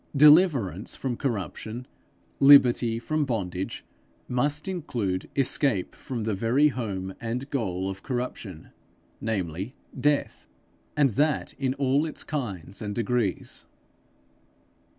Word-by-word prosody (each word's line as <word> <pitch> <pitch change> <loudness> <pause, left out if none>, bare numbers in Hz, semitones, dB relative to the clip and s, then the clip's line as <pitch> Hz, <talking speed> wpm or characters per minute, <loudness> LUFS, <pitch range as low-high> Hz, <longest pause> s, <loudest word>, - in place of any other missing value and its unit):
Deliverance 140 - +5
from 130 -3 -3
corruption, 115 -1 -4 0.5
liberty 125 -4 +6
from 155 +6 -1
bondage, 95 -8 -3 0.4
must 145 +6 0
include 120 - -2
escape 135 -6 +1
from 125 -5 -5
the 110 0 -1
very 120 +9 +3
home 100 -7 -4
and 120 +3 -3
goal 95 -8 -1
of 95 0 -5
corruption, 120 - -5 0.5
namely 95 - -3 0.3
death, 145 - -2 0.5
and 140 -3 +4
that 150 +6 +1
in 130 -1 0
all 140 +2 +2
its 155 - -4
kinds 100 - -4
and 105 -1 -4
degrees. 115 -4 -1
120 Hz, 110 wpm, -26 LUFS, 100-140 Hz, 0.5 s, liberty